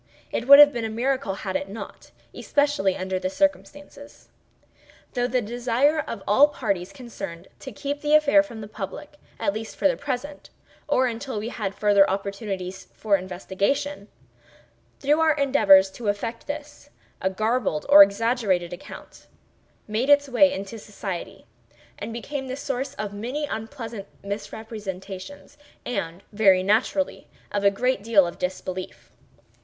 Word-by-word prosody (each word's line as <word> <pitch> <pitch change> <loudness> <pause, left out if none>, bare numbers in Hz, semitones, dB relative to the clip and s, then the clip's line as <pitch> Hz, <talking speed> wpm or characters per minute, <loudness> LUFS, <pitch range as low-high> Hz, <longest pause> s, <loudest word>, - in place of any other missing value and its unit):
It 235 - -3
would 280 +1 +11
have 290 0 +9
been 235 - -3
a 225 - -2
miracle 245 -2 -1
had 190 -1 -5
it 190 - -2
not—especially 210 +2 -2
under 185 0 -2
the 185 0 -2
circumstances. 290 +3 -3 0.8
Through 245 -1 0
the 250 -1 0
desire 245 +7 +1
of 225 -9 -5
all 270 +9 +6
parties 200 -10 -3
concerned, 195 -9 -8
to 265 - -8
keep 285 +2 -4
the 300 0 +3
affair 300 -1 +6
from 235 -7 -9
the 210 - -7
public, 215 +8 -8 0.2
at 200 -3 0
least 220 +1 -6
for - - +3
the 270 - +1
present, 285 +1 -5 0.4
or 260 -3 +3
until 245 0 -4
we 215 +3 -3
had 205 -5 -4
farther 200 -2 +4
opportunities 195 -1 -4
for 210 -2 +2
investigation—through 185 - -4
our 320 -1 +4
endeavors 200 -10 +5
to 225 +3 -7
effect 215 +4 -3
this—a 290 -8 -7
garbled 215 -4 -1
or 295 +1 +9
exaggerated 205 - +2
account 175 - -11 0.6
made 220 +6 -1
its 285 0 +5
way 275 +2 +4
into 210 -3 -6
society, 195 - -7 0.5
and - - -5
became 265 +4 -5
the 260 - -4
source 270 -1 -4
of 210 -1 -5
many 250 +9 -3
unpleasant 225 -3 -6 0.2
misrepresentations; 200 0 -7 0.3
and, 175 -6 -4
very 195 -3 +4
naturally, 225 +8 0 0.2
of 205 -1 -1
a 200 - +6
great 250 +2 0
deal 205 -3 +4
of 170 - -7
disbelief. 185 0 -5
220 Hz, 140 wpm, -24 LUFS, 195-270 Hz, 0.8 s, would